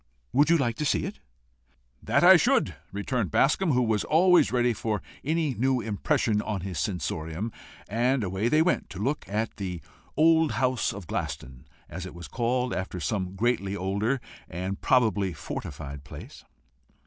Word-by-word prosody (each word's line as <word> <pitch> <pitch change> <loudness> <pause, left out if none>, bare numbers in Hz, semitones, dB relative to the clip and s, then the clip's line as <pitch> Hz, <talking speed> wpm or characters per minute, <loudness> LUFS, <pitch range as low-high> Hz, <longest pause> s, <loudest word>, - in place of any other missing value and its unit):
Would 145 +3 +4
you 170 - +6
like 120 -6 -1
to - - -2
see - - +1
it?" - - -7 0.8
"That - - +2
I - - +10
should," - - +3 0.2
returned 100 +1 -2
Bascombe, 150 - +2
who 125 0 +3
was 110 -3 +1
always 175 - +4
ready 120 -1 +2
for 110 -1 -2 0.2
any 155 -1 0
new 130 +3 +1
impression 110 +1 0
on 105 -3 -3
his 95 -2 -4
sensorium, 90 0 -3 0.4
and 120 +4 +1
away 95 +4 -1
they 155 +3 +4
went 180 - 0
to 90 - -8
look 135 +8 -1
at 110 +3 -2
the 90 -3 -4 0.4
old 160 0 +4
house 130 -2 +1
of 100 -3 -8
Glaston 65 -2 -5 0.2
as 90 +3 -6
it 90 - -11
was 85 - -8
called, 125 +1 -1
after 90 0 -4
some 95 0 -2
greatly 100 -2 0
older 100 +7 -1 0.3
and 95 +3 -4
probably 110 -8 +2
fortified 70 -1 -7
place. - - -11
110 Hz, 160 wpm, -27 LUFS, 95-130 Hz, 0.8 s, I